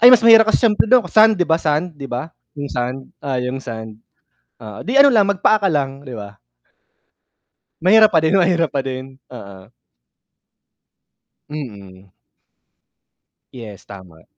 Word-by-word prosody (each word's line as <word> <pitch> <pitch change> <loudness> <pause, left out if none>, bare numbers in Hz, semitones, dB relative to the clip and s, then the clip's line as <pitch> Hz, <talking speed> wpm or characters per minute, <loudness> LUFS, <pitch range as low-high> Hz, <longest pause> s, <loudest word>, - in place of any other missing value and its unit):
Ay, 240 - +8
mas 245 -2 +5
mahirap 225 -1 +6
kasi 220 - +1
sIyempre 220 0 +2
dun 250 -1 +4
sand, 220 0 +4
'di 180 - 0
ba 160 -1 0
sand, 155 +3 -1
'di 135 -1 -8
ba? 125 +7 -6 0.2
Yung 145 -1 -7
sand, 125 +2 -5
oh 135 -2 -4
yung 125 +1 -4
sand. 110 -3 -9 0.6
Oo, 105 -1 -10
'di 235 - -4
ano 280 - +7
lang, 220 -6 +3
magpaa 200 +2 +1
ka 200 -2 -1
lang 140 -1 -4
'di 130 - -10
ba. 100 -2 -10 1.4
Mahirap 215 +4 +4
pa - - +3
din, 160 +2 0
mahirap 175 -3 +1
pa 140 - 0
din, 130 0 -8 0.2
oo. 100 -3 -13 1.8
Mm. 100 -10 -10 1.4
Yes, 110 -6 -12
tama. 90 -5 -15
140 Hz, 150 wpm, -18 LUFS, -, 1.8 s, Ay